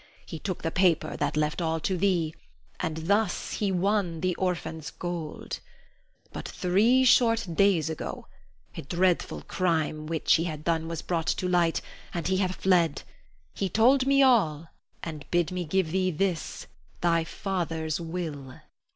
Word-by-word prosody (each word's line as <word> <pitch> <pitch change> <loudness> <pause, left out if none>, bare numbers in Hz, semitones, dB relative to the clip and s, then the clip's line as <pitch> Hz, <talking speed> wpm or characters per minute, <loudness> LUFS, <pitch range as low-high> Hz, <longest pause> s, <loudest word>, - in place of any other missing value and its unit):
He 160 - -7
took 185 0 -4
the 165 - -1
paper 180 -2 +2
that 145 +1 -1
left 150 +3 0
all 165 -1 0
to 190 - 0
thee, 175 -4 +1 0.5
and 160 0 -3
thus 205 +4 +1
he 205 -2 0
won 185 -3 0
the 185 -1 +1
orphan's 170 -5 -3
gold. 170 0 -5 0.7
But - - -6
three 220 +9 +3
short 230 -3 +4
days 180 -3 +3
ago, 160 -1 -5 0.5
a - - -5
dreadful 175 +4 0
crime 160 -4 -1
which 160 -1 +3
he 165 - -1
had 155 -3 -5
done 160 0 0
was 165 -1 -4
brought 170 -2 -1
to 180 - 0
light, 175 -2 +2 0.3
and 170 -2 -2
he 190 - +2
hath 185 -1 0
fled. 175 -5 +2 0.5
He 195 - -2
told 255 +7 +4
me 275 0 +5
all 165 - +3 0.3
and 155 -3 -6
bid 175 -1 +1
me 180 -1 -3
give 170 0 0
thee, 185 +1 +1
this, 180 0 -2 0.4
thy 165 -1 +3
father's 165 -3 -3
will. 160 -6 -5
175 Hz, 155 wpm, -27 LUFS, 160-190 Hz, 0.7 s, me